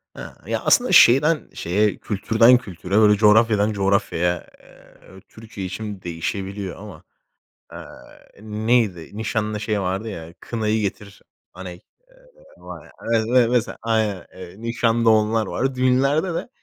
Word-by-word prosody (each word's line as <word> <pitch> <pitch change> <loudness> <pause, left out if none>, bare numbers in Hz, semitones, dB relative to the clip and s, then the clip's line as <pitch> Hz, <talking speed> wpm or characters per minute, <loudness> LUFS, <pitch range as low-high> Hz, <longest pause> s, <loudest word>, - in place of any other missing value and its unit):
Hı, - - -10
ya, - - -1
aslında 250 -4 +3
şeyden 150 0 +5
şeye, 100 +5 0
kültürden 110 +4 +3
kültüre, 95 -4 -6
öyle, 105 -1 +5
coğrafyadan 105 0 +3
coğrafyaya, 95 -3 -1
eee, 95 0 -19
Türkiye 110 -4 -8
için 105 -1 -7
değişebiliyor 95 +3 -5
ama, 105 -1 -12 0.7
eee, - - -8 0.6
neydi, 110 -5 -1
nişanda 110 -1 -2
şey 105 -1 -2
vardı, 95 +4 -3
ya? 85 -4 -9
"Kınayı 110 -1 -2
Getir 100 0 -6 0.3
Aney", 90 -1 -9 0.8
ııı, - - -18
var - - -9
ya, - - -18 0.2
e - - +4
evet, 110 - -1
me 125 -1 +3
mesela 120 -1 -1
aynen, 110 -4 -1
eee, 90 -1 -11
nişanda 115 0 +1
onlar 110 0 +2
var, 135 0 -2
düğünlerde 140 +7 +1
de. 165 - -5
105 Hz, 135 wpm, -21 LUFS, 95-115 Hz, 0.8 s, şeyden